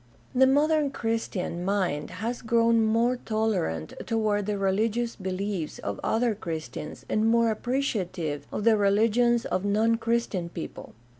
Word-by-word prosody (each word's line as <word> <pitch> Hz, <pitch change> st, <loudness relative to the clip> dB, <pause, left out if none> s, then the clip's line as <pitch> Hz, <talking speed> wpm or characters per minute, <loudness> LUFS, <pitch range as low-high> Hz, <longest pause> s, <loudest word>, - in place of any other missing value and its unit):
— -, -, -31 dB
The 265 Hz, -, +8 dB
modern 295 Hz, +2 st, +3 dB
Christian 225 Hz, -8 st, -2 dB
mind 185 Hz, -6 st, 0 dB, 0.2 s
has 240 Hz, +1 st, -2 dB
grown 230 Hz, 0 st, +3 dB
more 230 Hz, +3 st, +2 dB
tolerant 215 Hz, -, -1 dB
toward 210 Hz, -3 st, 0 dB
the 210 Hz, -, 0 dB
rehgious 215 Hz, +5 st, 0 dB
beliefs 190 Hz, -3 st, -3 dB
of 100 Hz, -1 st, -5 dB
other 230 Hz, 0 st, +1 dB
Christians 160 Hz, -6 st, -6 dB
and 215 Hz, +1 st, +1 dB
more 230 Hz, 0 st, +4 dB
appreciative 190 Hz, -, -2 dB
of 210 Hz, -, -3 dB
the 225 Hz, -1 st, +5 dB
religions 225 Hz, +4 st, +3 dB
of 185 Hz, -, -1 dB
non 220 Hz, +3 st, +2 dB
Christian 230 Hz, -7 st, -1 dB
people. 170 Hz, -, -8 dB
220 Hz, 140 wpm, -27 LUFS, 190-230 Hz, 0.2 s, The